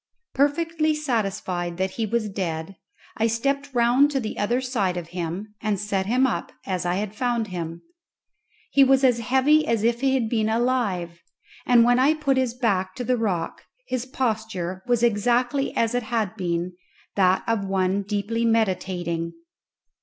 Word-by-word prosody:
Perfectly 310 +2 +1
satisfied 195 - -2
that 190 +1 -1
he 225 +2 -2
was 230 0 0
dead, 185 -2 -4 0.4
I 225 0 +2
stepped 275 +5 -1
round 245 +3 +4
to 280 -2 -1
the 220 -4 -4
other 235 +5 +1
side 220 -9 -1
of 170 -2 -6
him, 180 +4 -5
and 210 -3 0
set 195 -1 -1
him 250 +4 +3
up 260 - -2
as 185 -2 -2
I 175 - +1
had 205 +1 -3
found 235 -2 -1
him. 170 -2 -5 0.9
He 275 - +6
was 270 0 +4
as 250 -3 +4
heavy 265 +6 +3
as 230 -2 +1
if 235 +1 +1
he 270 -1 +2
had 240 -4 +1
been 220 -1 0
alive, 220 -8 0 0.5
and 240 -2 +6
when 245 +1 +4
I 285 +4 +4
put 280 -3 +1
his 255 -2 0
back 190 -7 0
to 250 - -4
the 250 +1 +1
rock 200 -8 -2 0.2
his 255 - -3
posture 220 -8 -2
was 240 -1 +2
exactly 245 +5 +2
as 230 +1 +1
it 245 - +1
had 220 -4 -2
been, 175 0 -2 0.4
that 185 -1 +3
of 225 -3 0
one 190 0 +1
deeply 210 +3 -2
meditating. 185 -6 0
225 Hz, 170 wpm, -24 LUFS, 190-250 Hz, 0.9 s, He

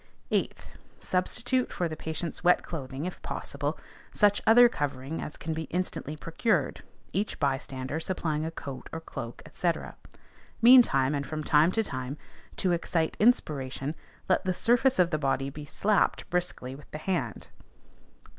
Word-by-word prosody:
8th, - - 0 0.4
Substitute 245 +7 0
for 175 - -1
the 160 - -5
patient's 160 +3 -4
wet 180 0 +5
clothing, 140 -2 -5
if 180 - -6
possible, - - -3 0.3
such 205 -1 +3
other 240 +2 +9
covering 145 - -3
as 150 - -6
can 160 - -3
be 160 0 -3
instantly 175 -4 -3
procured, 165 +9 0 0.3
each 205 +2 -1
bystander 135 0 -1
supplying 160 -3 -2
a 160 - -2
coat 140 -5 -8
or 160 - -4
cloak, 120 -7 -7
&c. 175 - +2 0.9
Meantime, 230 - +7
and 140 -1 -2
from 155 -1 -4
time 150 +3 +4
to 225 - +2
time, 130 -4 -4 0.4
to 185 - +1
excite 165 -1 0
inspiration, 145 - +1 0.3
let 185 - +2
the 185 -1 0
surface 245 +5 +3
of 180 -1 +4
the 155 - 0
body 135 -1 0
be 145 +1 -8
slapped 205 +8 +1
briskly 175 -7 -2
with 140 +2 -13
the - - -6
hand. 175 +3 -3
160 Hz, 150 wpm, -28 LUFS, 140-185 Hz, 0.9 s, other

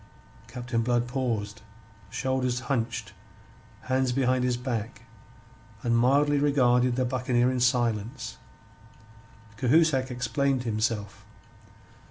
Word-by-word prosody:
Captain 120 -1 -3
Blood 120 +1 +1
paused, 115 -5 -3 0.5
shoulders 130 +1 -1
hunched, 120 -3 -2 0.7
hands 130 -1 0
behind 130 0 +1
his 125 -1 +1
back, 120 -3 -4 0.8
and 115 -1 +2
mildly 140 +4 +3
regarded 125 -4 +3
the 130 0 +1
buccaneer 125 0 +1
in 130 - -1
silence. 120 -1 0 1.2
Cahusac 135 +1 +3
explained 130 +2 0
himself. 110 -3 -2
125 Hz, 95 wpm, -27 LUFS, 120-130 Hz, 1.2 s, mildly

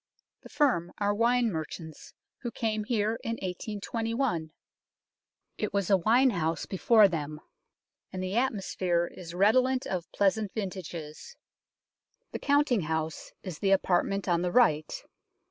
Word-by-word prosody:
The - - -13
firm 240 - +1
are 205 -1 +1
wine 235 +1 +2
merchants, 160 -1 -7 0.2
who 240 - -4
came 220 -2 -2
here 220 -1 0
in 230 - -2
1821. 215 - -3 1.1
It 210 - -2
was 200 -1 0
a 195 - +6
wine 240 +8 +4
house 165 -4 -1
before 210 +2 +5
them, 155 -4 -4 0.7
and 185 0 -4
the 185 +2 -3
atmosphere 190 -8 0
is 170 -1 -9
redolent 255 +7 +3
of 180 -3 -4
pleasant 200 +1 +1
vintages. 185 - -6 1.0
The - - -4
counting 285 -6 +2
house 160 0 -3
is 180 -5 -7
the 195 - +1
apartment 195 +1 +2
on 170 -1 +2
the 180 0 -1
right. 155 -11 +3
195 Hz, 130 wpm, -29 LUFS, 170-230 Hz, 1.1 s, a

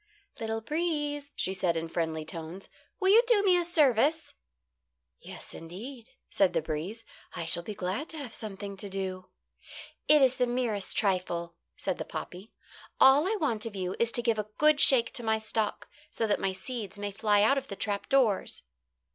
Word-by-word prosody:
"Little 225 0 -3
breeze," 295 0 -2
she 190 - -1
said, 180 -3 0
in 165 0 -3
friendly 160 -1 -2
tones, 165 +4 -7 0.3
"will 380 - +2
you 440 +4 +8
do 445 -5 +4
me 375 -3 +5
a 350 - +2
service?" 305 -2 +2 0.9
"Yes, - - -10
indeed," 220 +9 -9 0.2
said 195 -2 +2
the - - +1
breeze. 170 +9 -5 0.3
"I 165 - -4
shall 170 - +3
be 210 +4 -7
glad 195 - -3
to 320 - -7
have 275 -6 -7
something 200 -2 -7
to 200 +1 -6
do." 185 -1 -5 0.8
"It 300 -2 +6
is 260 -1 +3
the 250 - +2
merest 240 -5 -2
trifle," 180 -4 0 0.2
said - - -3
the - - -2
poppy. 185 +5 -7 0.5
"All 275 +5 +6
I 435 - +1
want 235 -8 0
of 215 - -8
you 185 -1 -3
is 235 0 +2
to 240 - +2
give 230 -2 +1
a 210 0 -4
good 305 -1 +4
shake 250 -7 +6
to 240 - -3
my 220 -1 +2
stalk, 220 -1 -2 0.2
so 225 - -2
that 210 - +1
my 195 - 0
seeds 205 +1 -6
may 205 0 -4
fly 205 0 +2
out 275 +6 +4
of 270 - -14
the 200 - -6
trap 200 +1 -3
doors." 245 -8 +1
220 Hz, 190 wpm, -29 LUFS, 190-275 Hz, 0.9 s, you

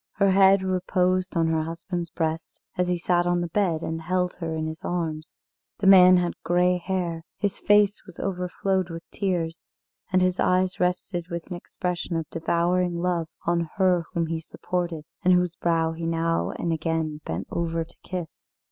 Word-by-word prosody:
Her 195 -1 +3
head 195 0 +5
reposed 185 0 0
on 165 - +3
her 160 -1 +1
husband's 170 +2 -4
breast 160 0 -3 0.2
as 180 0 +1
he 180 0 +1
sat 175 0 +1
on 175 0 +2
the 175 -1 -2
bed 170 -3 0
and 160 0 -3
held 180 +2 0
her 165 -2 -3
in 155 0 -2
his 160 0 -6
arms. 160 -2 -3 0.4
The 200 - -3
man 185 -1 +8
had 175 -1 0
grey 180 +1 +2
hair, 175 -2 -2 0.2
his 205 -1 -2
face 205 0 +4
was 180 - -13
overflowed 185 0 -1
with 165 0 -7
tears, 175 -4 -2 0.5
and 185 0 +4
his 185 0 +1
eyes 185 0 +2
rested 180 -1 -1
with 170 -1 -4
an - - -2
expression 175 0 -4
of 165 -2 -2
devouring 170 +2 +1
love 170 -1 0 0.2
on 170 -1 +1
her 180 -3 +3
whom 170 -1 +1
he 165 0 -2
supported, 170 -1 -4 0.2
and 185 0 +5
whose 180 -1 +1
brow 165 -1 +1
he 165 0 -4
now 165 0 0
and 170 - -2
again 160 -1 -2
bent 85 +4 -4
over 165 -1 -1
to 165 - -19
kiss. 180 -3 -6
175 Hz, 180 wpm, -25 LUFS, 165-185 Hz, 0.5 s, man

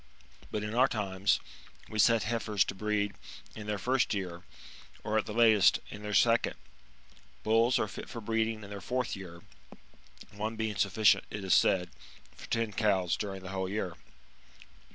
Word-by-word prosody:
But 105 - -3
in 105 +1 -4
our 125 +3 +5
times, 100 -4 0 0.5
we 110 - -5
set 115 0 +5
heifers 110 -3 +1
to - - -5
breed 105 0 -1 0.4
in 105 -1 -8
their 105 -1 -1
first 125 +2 +1
year, 90 -3 -4 0.6
or, 110 +1 +1
at - - -4
the - - -4
latest, 110 -4 +5
in 105 - -8
their 105 -1 -3
second. 115 +4 +3 0.9
Bulls 115 +3 +3
are - - 0
fit 100 - -8
for 115 - -6
breeding 110 0 -1
in 100 - -10
their 100 -1 -6
fourth 125 +5 -2
year; 85 -3 -10 0.9
one 110 +2 -4
being 110 -1 -2
sufficient, 100 +2 +3
it 105 -1 -6
is 95 - +2
said, 90 -2 +3 0.4
for - - -11
ten 115 -2 -1
cows 95 -5 +1
during 95 -2 -5
the 95 - -7
whole 95 -1 -3
year. 95 -4 -3
105 Hz, 170 wpm, -30 LUFS, 95-110 Hz, 0.9 s, our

